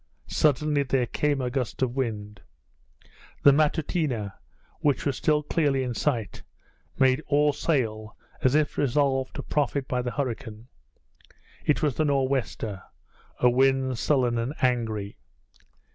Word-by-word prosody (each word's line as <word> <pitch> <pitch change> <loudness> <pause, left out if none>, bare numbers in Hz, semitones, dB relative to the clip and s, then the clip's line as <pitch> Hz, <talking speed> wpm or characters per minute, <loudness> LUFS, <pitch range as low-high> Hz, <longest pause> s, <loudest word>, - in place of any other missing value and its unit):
Suddenly 150 0 +2
there 130 -2 +1
came 145 +2 0
a 125 -1 -2
gust 130 -1 -2
of 125 -1 -1
wind. 105 -6 -3 1.0
The 140 - +9
Matutina, 145 - 0 0.5
which 145 -3 +1
was 140 -3 0
still 150 +2 +1
clearly 145 -4 +1
in 125 -1 -3
sight, 115 -5 -2 0.6
made 130 +1 +3
all 145 0 +3
sail, 110 -9 -1 0.2
as 130 +2 +3
if 155 -1 +1
resolved 135 -1 +1
to - - -5
profit 140 -2 -1
by 125 -1 -1
the 125 - -3
hurricane. 120 -4 -4 0.9
It 150 - +1
was 150 -3 +2
the 155 - 0
nor' 140 -2 +2
wester, 115 -7 -3 0.6
a 125 - +4
wind 130 -1 +2
sullen 125 -5 +1
and 125 +6 -3
angry. 110 -5 -1
130 Hz, 135 wpm, -26 LUFS, 120-145 Hz, 1.0 s, The